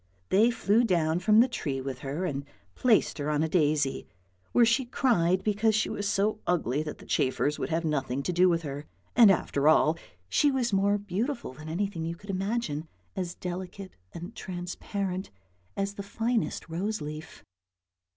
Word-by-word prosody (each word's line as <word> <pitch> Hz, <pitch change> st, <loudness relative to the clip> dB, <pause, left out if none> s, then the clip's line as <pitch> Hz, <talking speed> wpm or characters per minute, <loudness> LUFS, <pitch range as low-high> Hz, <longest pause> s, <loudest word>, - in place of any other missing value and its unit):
They 215 Hz, +5 st, +5 dB
flew 230 Hz, -1 st, +2 dB
down 170 Hz, -6 st, +2 dB
from 215 Hz, +4 st, +5 dB
the 250 Hz, -, +4 dB
tree 145 Hz, -, -3 dB
with 130 Hz, -1 st, -5 dB
her 145 Hz, +7 st, -3 dB
and 140 Hz, -5 st, -2 dB, 0.3 s
placed 230 Hz, -9 st, +2 dB
her 145 Hz, +1 st, -2 dB
on 150 Hz, 0 st, +1 dB
a -, -, +1 dB
daisy, 150 Hz, -4 st, +1 dB, 0.4 s
where 240 Hz, -, +5 dB
she 235 Hz, +4 st, +3 dB
cried 190 Hz, -8 st, +2 dB
because 215 Hz, +1 st, +2 dB
she 220 Hz, -, +1 dB
was 205 Hz, 0 st, -2 dB
so 205 Hz, +1 st, +1 dB
ugly 150 Hz, -6 st, +1 dB
that 155 Hz, -1 st, -5 dB
the -, -, -14 dB
chafers 145 Hz, +3 st, 0 dB
would -, -, -2 dB
have 165 Hz, 0 st, 0 dB
nothing 140 Hz, -3 st, -1 dB
to 180 Hz, -, -1 dB
do 180 Hz, +2 st, +5 dB
with 165 Hz, -1 st, +1 dB
her; 145 Hz, 0 st, -6 dB, 0.3 s
and 230 Hz, -4 st, +8 dB
after 150 Hz, -6 st, +2 dB
all, 155 Hz, 0 st, +4 dB, 0.3 s
she 290 Hz, -, +3 dB
was 250 Hz, -5 st, 0 dB
more 200 Hz, +1 st, +3 dB
beautiful 205 Hz, -, -3 dB
than 155 Hz, +4 st, -9 dB
anything 180 Hz, 0 st, -2 dB
you 165 Hz, +1 st, -3 dB
could 200 Hz, +4 st, -7 dB
imagine, 190 Hz, -5 st, -2 dB, 0.3 s
as 180 Hz, -2 st, -3 dB
delicate 185 Hz, +2 st, -6 dB, 0.2 s
and 175 Hz, +6 st, -8 dB
transparent 185 Hz, +1 st, -4 dB, 0.5 s
as 195 Hz, 0 st, -1 dB
the 200 Hz, -, -6 dB
finest 225 Hz, +3 st, -2 dB
rose 200 Hz, +6 st, -2 dB
leaf. 155 Hz, +2 st, -8 dB
180 Hz, 175 wpm, -28 LUFS, 155-210 Hz, 0.5 s, and